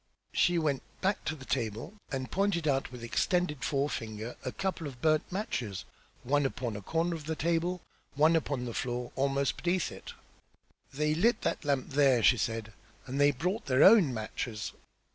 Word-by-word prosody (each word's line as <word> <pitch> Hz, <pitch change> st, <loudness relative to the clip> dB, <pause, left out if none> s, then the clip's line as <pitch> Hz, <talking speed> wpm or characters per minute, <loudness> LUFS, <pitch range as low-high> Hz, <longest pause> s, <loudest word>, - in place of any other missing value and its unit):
She 175 Hz, -1 st, +3 dB
went 150 Hz, -5 st, +1 dB, 0.2 s
back 195 Hz, +2 st, 0 dB
to 160 Hz, -, -1 dB
the 135 Hz, -4 st, -11 dB
table 115 Hz, -, -2 dB, 0.2 s
and 130 Hz, -2 st, -3 dB
pointed 190 Hz, -5 st, +1 dB
out 135 Hz, -2 st, +1 dB
with 125 Hz, -2 st, -9 dB
extended 150 Hz, +4 st, 0 dB
forefinger 115 Hz, -5 st, -2 dB
a -, -, -3 dB
couple 190 Hz, -5 st, -3 dB
of 130 Hz, -4 st, -9 dB
burned 155 Hz, +2 st, +2 dB
matches, 125 Hz, -, -3 dB, 0.4 s
one 145 Hz, +3 st, +2 dB
upon 125 Hz, -4 st, -2 dB
a 100 Hz, -, -5 dB
corner 165 Hz, -, 0 dB
of 160 Hz, -3 st, -6 dB
the 160 Hz, +1 st, -2 dB
table, 170 Hz, +2 st, 0 dB, 0.3 s
one 155 Hz, +3 st, +5 dB
upon 140 Hz, -5 st, -1 dB
the 120 Hz, -, -4 dB
floor 125 Hz, 0 st, -3 dB
almost 140 Hz, 0 st, 0 dB
beneath 180 Hz, +1 st, 0 dB
it. -, -, -9 dB, 0.8 s
"They 150 Hz, +2 st, 0 dB
lit 220 Hz, +8 st, +2 dB
that -, -, -1 dB
lamp 140 Hz, -3 st, 0 dB
there!" 135 Hz, -4 st, +4 dB
she 125 Hz, -, +6 dB
said. 110 Hz, +1 st, -2 dB, 0.3 s
"And 135 Hz, +2 st, -2 dB
they 145 Hz, -, +7 dB
brought 180 Hz, -, -2 dB
their 130 Hz, +1 st, +4 dB
own 190 Hz, -, +7 dB
matches. 110 Hz, -1 st, -4 dB
140 Hz, 175 wpm, -30 LUFS, 125-165 Hz, 0.8 s, they